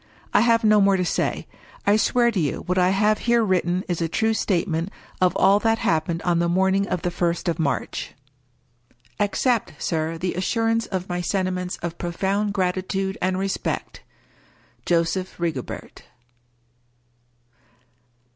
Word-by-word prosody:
I 205 - +5
have 230 0 +3
no 215 -1 +5
more 195 -1 +4
to 180 - 0
say. - - -1 0.4
I 205 - +5
swear 235 +2 +3
to 210 - -1
you 150 -5 -1
what 180 +1 +1
I 180 0 +4
have 210 +2 +2
here 235 -1 +2
written 185 -2 +1
is 175 -2 -2
a 165 - 0
true 220 +6 +1
statement 175 -4 0 0.3
of 180 -1 +3
all 200 +1 +5
that 225 +1 +2
happened 165 -3 0
on 175 -1 +2
the 170 0 +1
morning 190 +2 +2
of 180 - -2
the 175 - 0
first 175 0 -1
of 170 - -1
March. 140 -6 -2 1.0
Accept, 225 +3 +1
sir, 160 0 -2
the 180 +2 -2
assurance 225 +4 0
of 185 -1 -3
my 175 0 -2
sentiments 185 0 -2
of 170 0 -4
profound 195 +4 -1
gratitude 190 0 -1
and 185 0 +1
respect. 195 0 -3 0.9
Joseph 175 +2 0
Rigobert. 160 -7 -4
185 Hz, 145 wpm, -23 LUFS, 175-205 Hz, 1.0 s, I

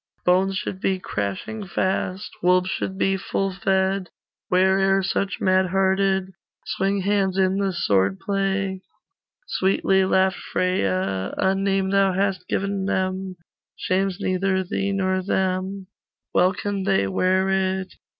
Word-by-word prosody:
Bones 190 +2 +3
should 185 - -4
be 190 -1 +1
crashing 100 - -4
fast, 190 +2 -2
Wolves 180 +1 +3
should 190 - -3
be 195 0 +1
full 195 0 -2
fed, 190 -1 0 0.4
Where'er 190 +1 +3
such, 195 +1 -1
mad 185 0 +3
hearted, 190 0 +1 0.3
Swing 195 +1 0
hands 195 -1 +1
in 190 0 +2
the 195 -1 +1
sword 95 - +1
play.' 195 -1 -1 0.6
Sweetly 190 - +2
laughed 190 0 +2
Freya 95 - -1
'A 190 - +2
name 195 0 0
thou 195 -1 +3
hast 190 -1 -1
given 195 0 -1
them 190 -1 -2 0.4
Shames 190 0 -1
neither 190 0 0
thee 195 +2 -2
nor 185 -1 0
them, 190 0 -1 0.5
Well 180 +1 +4
can 200 0 -3
they 195 - +2
wear 185 - +1
it. 190 0 -1
190 Hz, 130 wpm, -23 LUFS, 185-195 Hz, 0.6 s, Well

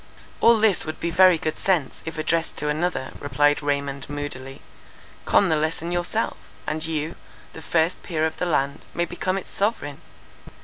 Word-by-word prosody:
"All 230 -1 +6
this 215 -4 +3
would 155 0 -5
be 170 - -1
very 185 0 +6
good 155 0 -3
sense, 175 -9 0
if 160 0 -5
addressed 160 +1 0
to 150 - -1
another," 155 -2 -1
replied 145 +1 +2
Raymond, 140 -1 -2
moodily, 135 -2 -6 0.6
"con 195 - +4
the 160 - +3
lesson 160 +2 -1
yourself, 175 +6 -1 0.3
and 155 +1 -2
you, 160 0 -2 0.4
the 160 - -9
first 165 +2 +1
peer 160 -3 -1
of 160 0 -2
the 180 - -1
land, 140 -3 0
may 175 - +1
become 185 +2 -2
its 195 - -7
sovereign. 195 -9 -1
160 Hz, 170 wpm, -24 LUFS, 145-175 Hz, 0.6 s, All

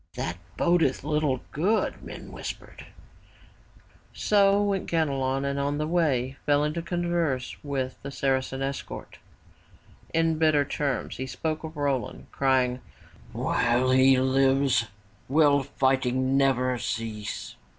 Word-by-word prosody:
''That 85 - -3 0.2
bodeth 170 -8 +2
little 150 -3 0
good,'' 195 +9 0
men - - -9
whispered. - - -8 1.3
So 200 -1 +4
went 200 -2 -1
Ganelon 135 -4 0
and 140 0 -1
on 140 +1 -1
the 150 - -1
way 140 -6 0
fell 145 0 +4
into 155 +3 -1
converse 170 -6 -1
with 135 -3 -3
the 140 - -6
Saracen 135 -1 -1
escort. 135 0 -6 0.9
In 165 -1 +1
bitter 155 -3 +3
terms 140 -1 -2
he 130 - -4
spoke 155 +4 -3
of 160 -1 -7
Roland 140 -3 -2
crying, 130 -2 +1 0.5
''While 125 +2 +1
he 130 0 +6
lives, 135 -2 +2 0.4
will 145 -1 +4
fighting 130 -1 +1
never 130 -2 +2
cease. 110 -3 -4
140 Hz, 120 wpm, -26 LUFS, 130-155 Hz, 1.3 s, he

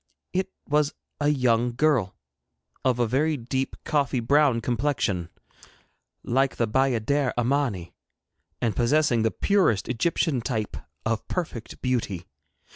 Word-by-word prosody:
It 190 +1 0 0.2
was 150 0 +1 0.2
a 145 - +1
young 125 -4 +2
girl 130 -9 +2 0.7
of 130 -2 +2
a 120 - +2
very 145 +6 +1
deep 130 +2 -2
coffee 140 -4 +1
brown 140 0 +3
complexion, 115 -8 -1 0.9
like 135 +2 +1
the 115 - 0
bayadère 130 +3 +1
Amani, 120 -8 0 0.7
and 115 -3 0
possessing 120 -1 +3
the 110 - +3
purest 185 - +2
Egyptian 130 +1 0
type 110 -3 -2 0.3
of 110 0 -1
perfect 155 -11 -5
beauty. 110 -9 -1
125 Hz, 120 wpm, -26 LUFS, 115-145 Hz, 0.9 s, brown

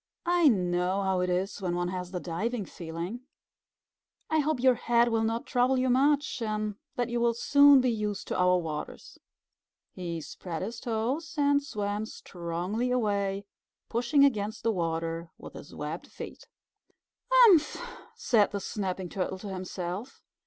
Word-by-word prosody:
"I 345 -2 +4
know 180 -3 +1
how 190 -1 +1
it 180 0 0
is 185 +3 -1
when 175 -2 -1
one 175 0 -1
has 180 -1 -4
the 180 -1 -4
diving 205 +6 -3
feeling. 170 +7 -6 1.1
I 315 - +3
hope 305 -2 0
your 260 +1 +5
head 235 0 +2
will 225 -1 +1
not 225 +1 -1
trouble 255 +2 +2
you 255 0 +2
much, 285 +1 +2
and 215 -1 -2 0.2
that 245 -1 -1
you 240 0 -1
will 235 -1 +2
soon 285 +2 +6
be 250 -1 +2
used 210 -2 -3
to - - -1
our 180 0 +4
waters." 160 -4 -6 0.7
He 170 -2 -5
spread 165 +1 -6
his 225 +4 -5
toes 255 +7 -2
and 285 0 +3
swam 210 -5 -3
strongly 180 +8 -3
away, 200 -5 0 0.4
pushing 245 +5 +3
against 215 -4 -1
the 230 - +2
water 165 -2 -2
with - - -11
his - - -11
webbed - - -5
feet. - - -10 0.8
"Humph!" 445 -12 +6 0.4
said 220 -5 +3
the 200 - -3
Snapping 190 -2 -3
Turtle 190 +1 -3
to 200 +2 -8
himself. 185 +4 -5
210 Hz, 155 wpm, -29 LUFS, 180-250 Hz, 1.1 s, soon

